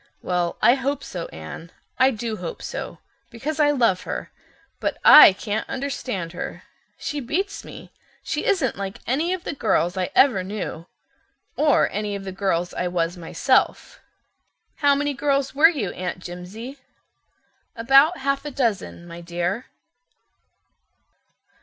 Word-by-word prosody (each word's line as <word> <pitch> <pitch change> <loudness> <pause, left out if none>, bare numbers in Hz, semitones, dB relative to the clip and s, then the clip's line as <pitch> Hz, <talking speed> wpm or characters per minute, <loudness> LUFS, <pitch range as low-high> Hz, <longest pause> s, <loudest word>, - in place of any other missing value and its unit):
"Well, 175 -1 -1
I 240 - +7
hope 275 +1 -2
so, 175 -2 -6
Anne. 80 - -9 0.3
I 260 - +6
do 225 -2 -4
hope 175 -2 -7
so, - - -6 0.3
because 295 +7 -5
I 295 -1 +5
love 235 -10 +2
her. - - -5 0.5
But - - -2
I 300 - +11
can't 205 +2 -4
understand 255 -10 -4
her—she 290 +10 -7
beats 355 +10 -3
me. - - -11 0.3
She 310 -2 -2
isn't 335 - +1
like 195 0 -5
any 300 +8 0
of 370 -2 -3
the - - -4
girls 190 -8 +1
I 185 -1 -1
ever 245 -9 +4
knew, 185 -4 -6 0.7
or 295 -1 +3
any 210 0 -3
of 200 - -6
the 190 - -5
girls 185 -2 -1
I 180 - -2
was 175 0 -1
myself." 175 +9 0 0.8
"How 285 -2 +4
many 290 +1 -1
girls 275 +1 0
were 305 +4 +7
you, 265 - -3
Aunt 180 0 -4
Jimsie?" 185 +10 -9 1.0
"About 275 +9 +5
half 275 +1 -1
a 295 - -5
dozen, 230 -10 -2
my 170 0 -9
dear." 175 +7 -3
230 Hz, 140 wpm, -23 LUFS, 180-280 Hz, 1.0 s, I